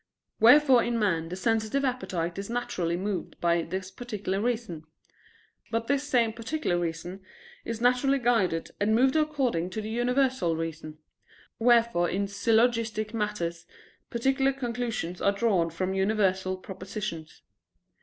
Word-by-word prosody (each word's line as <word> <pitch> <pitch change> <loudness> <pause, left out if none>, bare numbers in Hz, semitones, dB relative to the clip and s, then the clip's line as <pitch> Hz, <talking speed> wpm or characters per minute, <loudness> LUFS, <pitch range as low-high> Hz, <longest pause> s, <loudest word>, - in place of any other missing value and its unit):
Wherefore 255 +1 +7
in 235 0 -1
man 170 -7 0
the 180 - -4
sensitive 225 +6 0
appetite 185 -9 -2
is 195 - -6
naturally 180 -8 -2
moved 195 0 -4
by 170 0 +2
this 185 +3 -5
particular 205 -3 -4
reason. 220 -9 -2 0.9
But 230 0 -1
this 280 +2 +1
same 235 -5 +2
particular 230 - -2
reason 175 +3 -4 0.4
is 230 - -4
naturally 250 +3 +3
guided 220 -10 +1
and 215 +2 +2
moved 260 +4 +3
according 270 - 0
to 185 - -5
the 215 - -5
universal 250 -6 +1
reason: 160 -1 -5 0.6
wherefore 230 -7 +3
in 200 +2 -1
syllogistic 220 +1 +1
matters 175 -6 -3 0.4
particular 270 +3 +1
conclusions 235 -8 -3
are 200 - +3
drawn 200 -5 +1
from 185 +3 -2
universal 190 -2 +1
propositions. 185 -3 -7
215 Hz, 130 wpm, -27 LUFS, 180-240 Hz, 0.9 s, Wherefore